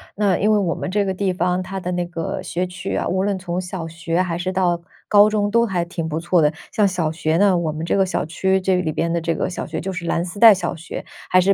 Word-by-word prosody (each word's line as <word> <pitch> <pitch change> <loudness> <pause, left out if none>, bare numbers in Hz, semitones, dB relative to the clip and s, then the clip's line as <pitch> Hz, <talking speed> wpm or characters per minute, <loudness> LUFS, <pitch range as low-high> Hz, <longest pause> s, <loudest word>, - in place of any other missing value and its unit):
那 200 -3 +2
因 210 +2 +2
为 215 - +4
我 175 -4 0
们 185 - -4
这 205 0 +1
个 190 - -1
地 190 0 0
方， 180 0 0
它 190 +1 -5
的 180 - -4
那 175 0 -1
个 170 -2 -4
学 180 +1 -2
区 180 0 -5
啊， - - -1
无 190 +1 0
论 200 -2 -1
从 180 0 -3
小 175 -2 -5
学 165 +1 -1
还 170 -2 -2
是 185 +1 -2
到 180 -2 +1 0.3
高 205 +1 +6
中 205 -1 0
都 235 +2 +3
还 180 -5 -1
挺 165 -2 -4
不 155 - -2
错 175 0 +2
的。 150 +1 +3 0.2
像 210 - +3
小 175 -5 0
学 160 0 0
呢， 195 -2 +4
我 165 -2 -1
们 155 +2 -5
这 - - 0
个 195 -1 +3
小 185 - -2
区， 190 +4 +1
这 190 0 +1
里 180 -3 0
边 165 +2 -1
的 170 - 0
这 165 0 -1
个 - - -1
小 175 - -5
学 - - -4
就 190 +1 -4
是 175 -1 -5
蓝 170 +1 0
丝 180 +3 -8
带 225 -1 +9
小 180 -1 -3
学， 165 +1 -7 0.2
还 185 - +5
是 195 +2 +4
180 Hz, 305 characters per minute, -21 LUFS, 170-190 Hz, 0.3 s, 带